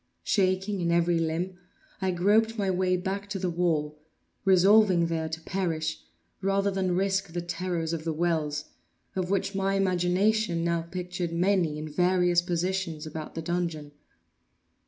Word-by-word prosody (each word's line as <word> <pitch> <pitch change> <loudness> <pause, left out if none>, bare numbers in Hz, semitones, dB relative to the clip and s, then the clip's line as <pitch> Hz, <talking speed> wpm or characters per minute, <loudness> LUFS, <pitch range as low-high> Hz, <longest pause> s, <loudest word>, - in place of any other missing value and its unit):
Shaking 190 0 +1
in 170 0 +1
every 170 0 +3
limb, 170 +3 -2 0.4
I 190 - +1
groped 210 +6 +2
my 195 -2 +1
way 185 0 +1
back 195 +2 -4
to 200 - -3
the 185 -2 -1
wall—resolving 175 +4 +2
there 165 -1 -2
to 160 0 -4
perish 160 -4 -2 0.4
rather 195 +1 +1
than 185 -2 0
risk 195 -1 0
the 175 - -2
terrors 175 -2 -2
of 160 -1 -3
the 165 - -1
wells, 155 -2 -1 0.5
of 185 -1 -1
which 195 +1 0
my 195 0 0
imagination 185 0 +1
now 170 0 +1
pictured 180 0 -4
many 170 -3 +1
in 155 +1 -5
various 175 +2 +3
positions 175 -2 -2
about 155 0 -7
the 165 - -4
dungeon. 165 -3 -2
180 Hz, 145 wpm, -27 LUFS, 165-190 Hz, 0.5 s, every